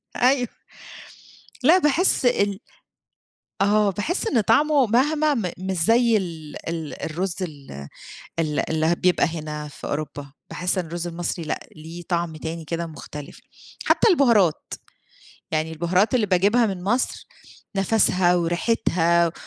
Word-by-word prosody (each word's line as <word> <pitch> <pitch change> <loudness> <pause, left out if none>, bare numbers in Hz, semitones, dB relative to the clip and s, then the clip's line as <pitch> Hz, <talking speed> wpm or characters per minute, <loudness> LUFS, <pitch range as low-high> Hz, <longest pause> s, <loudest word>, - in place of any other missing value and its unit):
أيوه. 250 0 +3 1.2
لا 335 +7 +6
باحس 310 -3 +2
ال 200 -4 +1 1.0
آه، 205 0 +3
باحس 325 - -2
إن 235 - +2
طَعمه 285 +5 +3
مهما 295 +6 +2
م 195 -9 -2
مش 190 0 -3
زي 230 +6 +3
ال 165 -5 -6
ال 160 -3 -5
الرز 175 +3 -3
ال 135 - -7 0.5
ال 155 -2 -1
اللي 160 +1 +2
بيبقى 180 0 +2
هنا 155 -2 -5
في - - -10
أوروبا. 145 -2 -5 0.2
باحس 180 +1 -1
إن 175 - -2
الرز 170 +1 -5
المصري 170 -1 -4
لأ، - - -4
ليه 165 +3 -9
طَعم 170 -2 -1
تاني 160 +1 -6
كده 165 +2 -3
مختلِف. 150 -2 -10 0.4
حتى - - +4
البُهارات، 235 - +3 0.8
يعني 160 +1 -1
البُهارات 180 +8 +1
اللي 225 -4 +2
باجيبها 200 +6 +3
من 190 -3 -4
مصر 240 +5 -1 0.5
نَفَسها 190 -3 +3
وريحتها 170 -2 +1
180 Hz, 130 wpm, -23 LUFS, 160-225 Hz, 1.2 s, لا